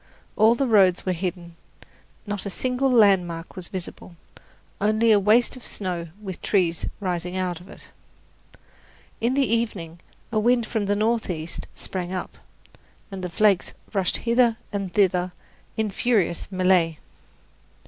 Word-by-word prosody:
All 220 +2 +5
the 275 - 0
roads 195 -6 +4
were 185 - +1
hidden, 175 -1 -4 0.7
not 205 -2 -4
a - - -2
single 255 +6 0
landmark 185 -7 +3
was 185 -2 -6
visible, 180 -1 -7 0.7
only 215 +2 +3
a 210 - +6
waste 220 +6 +3
of 255 - -12
snow 180 -4 -4
with 190 -4 -7
trees 175 -5 +1
rising 180 -1 -3
out 180 -2 -2
of 180 - -15
it. - - -10 1.3
In 240 +3 +1
the 275 -1 +3
evening 205 -8 -2 0.3
a 215 - +2
wind 240 +1 +3
from 215 -3 -2
the 205 - +2
northeast 205 -7 -1
sprang 180 -1 -5
up, 185 -1 -5 0.8
and 190 -1 -6
the 180 - -2
flakes 195 +1 +2 0.2
rushed 195 -3 +1
hither 235 -1 +3 0.2
and 195 -3 -3
thither 180 -2 +2 0.4
in 220 -2 0
furious 200 -6 +1
melee. 185 -4 +2
195 Hz, 140 wpm, -24 LUFS, 180-220 Hz, 1.3 s, a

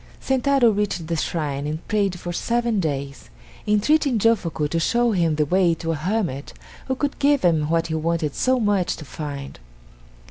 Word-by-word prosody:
Sentaro 265 -2 +3
reached 200 -5 -1
the 165 +1 -2
shrine 150 -3 -2
and 155 +2 -5
prayed 200 -4 0
for 175 0 -5
seven 235 +2 0
days, 140 -4 -4 0.4
entreating 250 +5 +2
Jofuku 195 -9 +1
to 165 +3 -1
show 235 +7 +2
him 170 -6 +1
the 150 0 +1
way 175 +1 +2
to 165 0 -3
a - - -1
hermit 170 -4 -2 0.3
who 260 - 0
could 285 +1 -3
give 285 -3 +3
him 160 -4 +2
what 165 0 +1
he 160 - -4
wanted 160 -1 -1
so 255 0 +1
much 205 -5 +1
to 155 - -10
find. 140 -1 -7
175 Hz, 175 wpm, -22 LUFS, 155-225 Hz, 0.4 s, Sentaro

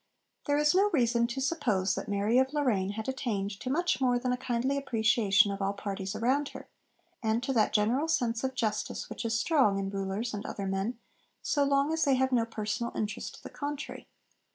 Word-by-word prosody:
There 290 0 +2
is 295 0 +4
no 395 +3 +4
reason 235 - +2
to 235 +3 -4
suppose 245 - +1
that - - -4
Mary 205 +4 +2
of 265 +2 +1
Lorraine 215 -10 +1
had 220 +1 -5
attained 235 -7 -2
to 255 - -4
much 345 +2 +1
more 250 -2 +3
than 250 +1 -1
a - - +2
kindly 250 +2 -1
appreciation 220 -6 +3
of 200 0 -5
all 195 +1 0
parties 195 -1 -4
around 270 +5 +1
her, - - -12 0.5
and 225 +1 0
to 270 - -1
that 220 -4 +3
general 230 +8 +2
sense 240 -7 0
of 265 0 -2
justice 215 -4 -2
which - - -5
is 225 -1 +1
strong 265 -12 +3
in 195 0 -2
rulers 195 +4 -3
and 205 - -4
other 200 - -5
men 195 +5 -2 0.5
so 290 - +2
long 280 +2 +2
as 320 - +1
they 275 -3 +4
have 260 +1 +1
no 235 -3 +3
personal 230 +1 -3
interest 210 -1 -3
to - - -16
the - - -9
contrary. 290 0 -5
235 Hz, 205 wpm, -30 LUFS, 210-270 Hz, 0.5 s, is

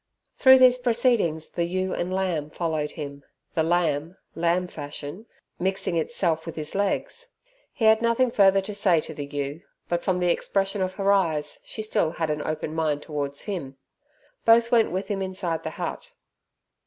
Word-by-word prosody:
Through 260 -1 +7
these 255 -1 +6
proceedings 235 -10 +1
the 170 - -1
ewe 185 +2 -2
and 175 +1 -2
lamb 180 -6 -1
followed 155 -2 -2
him, 140 -3 -7 0.3
the 160 - +1
lamb 165 0 0 0.2
lamb 170 +2 +1
fashion 150 +6 -7 0.3
mixing 190 -1 -1
itself 165 -2 0
with 165 - -5
his 155 -1 -3
legs. 205 - -1 0.4
He 230 - -2
had 220 0 +6
nothing 235 +1 +2
further 195 -2 +5
to 200 +2 -6
say 190 -5 +3
to 160 - -6
the 145 -1 -6
ewe, 145 +2 -4 0.3
but 170 0 -1
from 185 -1 +1
the 180 -1 +2
expression 195 +2 0
of 185 0 -1
her 200 0 +2
eyes 160 -7 +1
she 215 - -5
still 170 -6 0
had 160 -2 -1
an 150 0 -2
open 155 0 -3
mind 155 -2 -1
towards 145 -2 -4
him. 155 -10 -5 0.7
Both 230 +1 +5
went 230 -2 +4
with 190 +2 -3
him 195 -1 -2
inside 185 -3 -2
the - - -4
hut. - - -5
175 Hz, 175 wpm, -25 LUFS, 155-200 Hz, 0.7 s, Through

